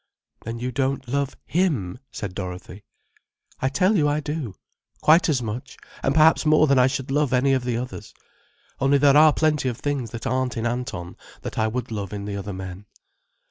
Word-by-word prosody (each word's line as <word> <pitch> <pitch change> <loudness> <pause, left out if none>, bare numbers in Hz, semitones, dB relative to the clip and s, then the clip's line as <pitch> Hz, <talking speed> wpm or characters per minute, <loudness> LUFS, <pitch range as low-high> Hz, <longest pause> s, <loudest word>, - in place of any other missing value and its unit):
"Then 115 +1 -4
you 125 +2 -3
don't 135 +1 -1
love 140 +2 -2
him," 135 - 0
said 100 -3 -5
Dorothy. 90 +1 -7 0.8
"I 130 - +2
tell 185 +10 +2
you 150 -6 +3
I 145 +1 +1
do;—quite 155 - 0
as 130 -5 +1
much, 120 +5 -6 0.2
and 135 - 0
perhaps 160 +1 +5
more 155 0 +5
than 140 -3 +4
I 125 - +6
should 135 0 -3
love 145 0 +1
any 135 +2 +3
of 130 -2 +1
the 120 -2 0
others. 120 -3 -7 0.6
Only 135 +1 +4
there 140 0 +5
are 155 +1 +8
plenty 150 -4 +1
of 120 - -5
things 140 -5 -2
that 115 +1 -7
aren't 130 0 -1
in 115 - -2
Anton 120 -8 -4 0.3
that - - -4
I 110 - +2
would 120 +2 -4
love 105 -2 -4
in 100 -1 -5
the 100 -1 -4
other 100 0 -5
men." 95 +1 -8
130 Hz, 190 wpm, -24 LUFS, 110-145 Hz, 0.8 s, are